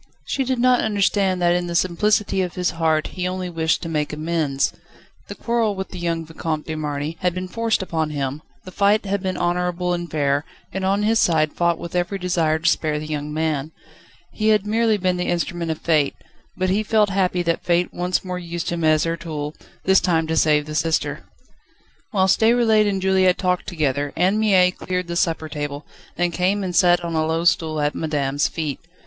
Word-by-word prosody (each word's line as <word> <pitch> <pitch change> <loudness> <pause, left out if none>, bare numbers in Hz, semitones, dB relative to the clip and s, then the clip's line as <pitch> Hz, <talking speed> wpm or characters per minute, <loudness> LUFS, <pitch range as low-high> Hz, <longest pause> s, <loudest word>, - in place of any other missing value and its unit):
She 270 - -1
did 260 0 -1
not 250 +1 +4
understand 200 -3 +1
that 175 0 +4
in 175 0 -1
the 170 - -4
simplicity 190 +3 +1
of 180 -2 -3
his 180 -1 0
heart, 160 -2 0
he 180 -1 -2
only 185 -1 -4
wished 160 0 0
to - - -4
make 150 -2 -1
amends. 155 -3 -1 0.5
The - - -7
quarrel 230 -3 0
with 190 0 -5
the 185 - -8
young 165 -1 -2
Vicomte 160 -1 -4
de 160 - -4
Marny 150 +1 -3
had 180 -1 0
been 185 0 -4
forced 230 0 0
upon 160 -4 -2
him, 140 0 -3 0.2
the 185 - -9
fight 205 +3 +2
had 200 0 -1
been 185 -1 -2
honourable 180 0 0
and 175 -1 -4
fair, 145 -1 0 0.3
and 190 +1 -3
on 195 +2 +1
his 225 +2 +3
side 155 -3 +2
fought 170 -1 +1
with 170 +1 -7
every 180 +3 0
desire 170 -4 +1
to 165 +1 -2
spare 155 -3 +1
the 150 - -5
young 150 -1 -4
man. 155 -1 -2 0.6
He 215 - -2
had 210 -2 +3
merely 220 0 +2
been 185 -2 0
the 180 - -2
instrument 175 -1 -2
of 160 - -1
Fate, 155 -4 +1 0.4
but 185 0 0
he 205 +3 +2
felt 215 -1 +2
happy 185 -2 +1
that 170 -1 -1
Fate 175 0 +1
once 180 +2 -1
more 180 -1 -4
used 170 -1 -4
him 170 -1 -2
as 155 -1 +4
her 165 0 -1
tool, 150 -3 -5 0.3
this 190 0 +5
time 165 -3 +1
to 160 0 -2
save 150 -2 +3
the 155 - -7
sister. 160 +1 -1 0.9
Whilst 190 -3 +3
Déroulède 220 -2 +4
and 195 -2 -2
Juliette 190 -1 +3
talked 180 -1 -1
together 145 -4 -1
Anne 185 +5 +2
Mie 190 -4 +4
cleared 180 0 -3
the 170 0 -5
supper 165 -3 0
table, 145 -1 -5 0.3
then 175 0 0
came 190 +4 0
and 180 -2 -3
sat 175 -1 +4
on 170 - -3
a 160 -1 +1
low 160 +1 -1
stool 160 -2 +2
at 145 0 0
madame's 145 -3 0
feet. 155 -4 -4
175 Hz, 205 wpm, -22 LUFS, 160-190 Hz, 0.9 s, this